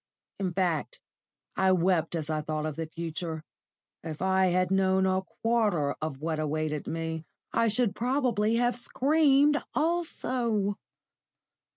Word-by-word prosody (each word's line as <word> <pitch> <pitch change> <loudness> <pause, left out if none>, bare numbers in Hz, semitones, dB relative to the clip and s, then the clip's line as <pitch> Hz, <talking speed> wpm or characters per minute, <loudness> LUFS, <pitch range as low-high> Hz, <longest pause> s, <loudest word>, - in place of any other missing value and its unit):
In 190 -2 -1
fact, 175 -4 -1 0.6
I 190 0 +3
wept 175 -2 +1
as 155 -3 -3
I 155 -1 -1
thought 155 0 -3
of 155 -2 -3
the 160 0 -4
future. 165 0 -5 0.6
If 160 -2 -6
I 190 0 +3
had 185 0 +1
known 190 0 +3
a 190 0 +2 0.2
quarter 210 -11 +2
of 155 -3 -3
what 160 +1 -2
awaited 155 0 -2
me, 160 -1 -3 0.3
I 230 0 +3
should 220 -1 +1
probably 240 -4 +1
have 240 0 +2
screamed 290 +3 +3
also. 250 - 0
190 Hz, 135 wpm, -28 LUFS, 160-230 Hz, 0.6 s, I